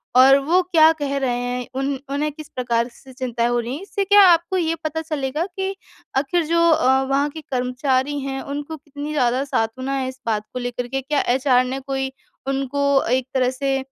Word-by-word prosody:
और 265 +2 +8
वो 360 +4 +4
क्या 325 -3 +5
कह 280 -1 -1
रहे 250 -3 0
हैं 245 0 -3
उन 270 -1 -1
उन्हें 295 +2 -1
किस 305 0 -11
प्रकार 235 -2 0
से 265 -1 -16
चिंताएँ 240 -2 -1
हो 240 0 +1
रही 235 +3 -3
हैं? 310 - -7
इससे 400 0 -2
क्या 405 +1 +7
आपको 340 +2 +3
ये 330 -2 0
पता 315 +1 -2
चलेगा 305 0 -2
कि 385 +1 -4 0.4
आख़िर 310 +4 +1
जो 335 +2 +1
अ, 265 -3 +4
वहाँ 275 +2 +1
के 315 +2 -9
कर्मचारी 260 +2 0
हैं, 270 0 -4
उनको 290 +3 -5
कितनी 290 +1 -7
ज़्यादा 255 -2 +1
सांत्वना 260 +2 -2
है 260 -1 -1
इस 260 0 -11
बात 215 -2 0
को 250 - -3
लेकर 245 0 -4
के 270 +2 -2
क्या 285 +2 0
एचआर 255 -2 +3
ने 265 +2 -3
कोई 270 0 -3 0.4
उनको 275 +1 -1 0.3
एक 255 0 +2
तरह 255 -1 +2
से 270 +1 -1
270 Hz, 205 wpm, -21 LUFS, 255-300 Hz, 0.4 s, और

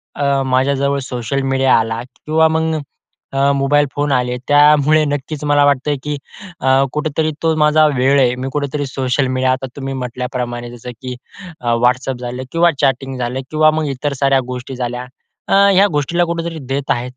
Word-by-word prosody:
अ, 145 - -1 0.2
माझ्याजवळ 140 +2 +1
social 125 +2 -2
media 135 0 +2
आला 115 0 -2
किंवा 155 +5 0
मग 160 0 0 0.6
अ, 135 +1 +3
मोबाईल 145 +1 +2
फोन 145 0 0
आले. 125 -1 0
त्यामुळे 150 +1 +5
नक्कीच 145 +1 -4
मला 145 0 +4
वाटतं 145 +1 +1
की 150 -1 -3 0.4
अ, 135 +1 +4
कुठेतरी 155 +1 -1
तो 160 -1 +2
माझा 155 0 +4
वेळ 135 0 +2
आहे. 125 -2 +3
मी 130 +1 -4
कुठेतरी 145 0 -2
सोशल 130 0 -1
मीडिया 130 0 +2
आता 130 +1 -2
तुम्ही 135 -1 -5
म्हटल्याप्रमाणे 125 -1 -4
जसं 120 +1 -8
की 125 -1 -5 0.5
अ, 120 -1 0
व्हाट्सअप 125 +2 +1
झालं 125 +1 -5
किंवा 170 0 +3
चॅटिंग 135 0 0
झालं 125 +1 -3
किंवा 155 0 +4
मग 155 0 -1
इतर 145 +2 -2
साऱ्या 135 -1 +4
गोष्टी 125 +1 -6
झाल्या. 125 0 -4 0.4
अ, - - 0 0.2
ह्या 195 +2 +5
गोष्टीला 160 +4 +1
कुठेतरी 170 -1 -4
देत 135 +1 -1
आहे. 125 +1 -1
135 Hz, 170 wpm, -17 LUFS, 125-150 Hz, 0.6 s, त्यामुळे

